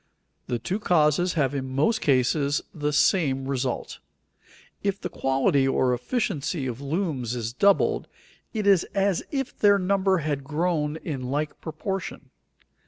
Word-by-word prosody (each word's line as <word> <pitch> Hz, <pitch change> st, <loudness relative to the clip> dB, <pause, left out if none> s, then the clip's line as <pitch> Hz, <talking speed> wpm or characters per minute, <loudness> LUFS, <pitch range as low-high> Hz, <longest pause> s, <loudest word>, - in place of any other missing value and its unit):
The 120 Hz, -, -1 dB
two 180 Hz, -, -3 dB
causes 175 Hz, -2 st, +2 dB
have 145 Hz, -4 st, +1 dB
in 130 Hz, -2 st, -4 dB
most 220 Hz, +11 st, +2 dB
cases 140 Hz, +2 st, +2 dB
the 150 Hz, -1 st, -1 dB
same 140 Hz, -4 st, +2 dB
result. 130 Hz, -2 st, -3 dB, 0.8 s
If 200 Hz, 0 st, -1 dB
the 180 Hz, -, -4 dB
quality 135 Hz, -1 st, +1 dB
or 130 Hz, -1 st, +2 dB
efficiency 145 Hz, -, -2 dB
of 125 Hz, 0 st, -4 dB
looms 140 Hz, -, -2 dB
is 115 Hz, -1 st, -3 dB
doubled, 200 Hz, +9 st, +3 dB, 0.4 s
it 215 Hz, -3 st, -3 dB
is 195 Hz, -4 st, +5 dB
as 195 Hz, -2 st, +2 dB
if 270 Hz, -3 st, -3 dB
their 205 Hz, -1 st, +5 dB
number 190 Hz, 0 st, +2 dB
had 145 Hz, -4 st, -2 dB
grown 155 Hz, +1 st, -1 dB
in 135 Hz, -6 st, -5 dB
like 150 Hz, +2 st, -2 dB
proportion. 185 Hz, +4 st, -5 dB
150 Hz, 140 wpm, -25 LUFS, 135-190 Hz, 0.8 s, is